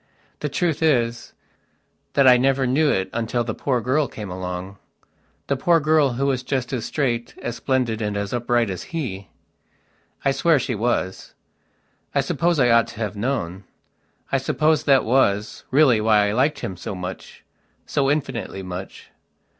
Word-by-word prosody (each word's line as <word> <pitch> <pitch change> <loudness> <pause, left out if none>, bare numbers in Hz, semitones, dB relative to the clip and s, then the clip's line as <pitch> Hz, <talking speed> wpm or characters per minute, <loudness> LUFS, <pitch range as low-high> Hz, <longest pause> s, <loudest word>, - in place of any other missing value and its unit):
The 150 - -2
truth 160 +2 -1
is, 120 -7 +1 0.8
that 140 -2 +4
I 125 - +9
never 135 +1 +2
knew 145 +5 +2
it 95 -6 +1
until 115 +1 -1
the 110 -1 -3
poor 125 -4 -1
girl 135 +5 +1
came 105 -4 -8
alongthe 90 +2 -5 0.8
poor 170 +2 +4
girl 155 -3 +3
who 135 +3 -1
was 135 -2 0
just 130 0 -3
as 120 -3 -2
straight, 120 -5 -2
as 120 -1 -3
splendid 125 -5 0
and 105 -1 -2
as 100 +1 -3
upright 120 -2 +1
as 90 - -6
he. 100 -10 -4 1.0
I 135 - +4
swear 165 +3 +3
she 130 - -2
was. 110 -4 -2 0.8
I - - +4
suppose 170 -2 0
I 125 -2 +4
ought 115 0 +4
to - - -11
have 105 -2 -3
known. 100 -5 -2 0.7
I 135 - +2
suppose 155 +3 +1
that 135 -2 +4
was, 105 -4 +1
really, 130 -5 +4
why 105 -2 +3
I - - 0
liked 135 +6 +1
him 95 - -5
so 95 - -6
muchso 95 +8 -5
infinitely 130 -9 -3
much. 90 +1 -8
120 Hz, 160 wpm, -22 LUFS, 105-140 Hz, 1.0 s, I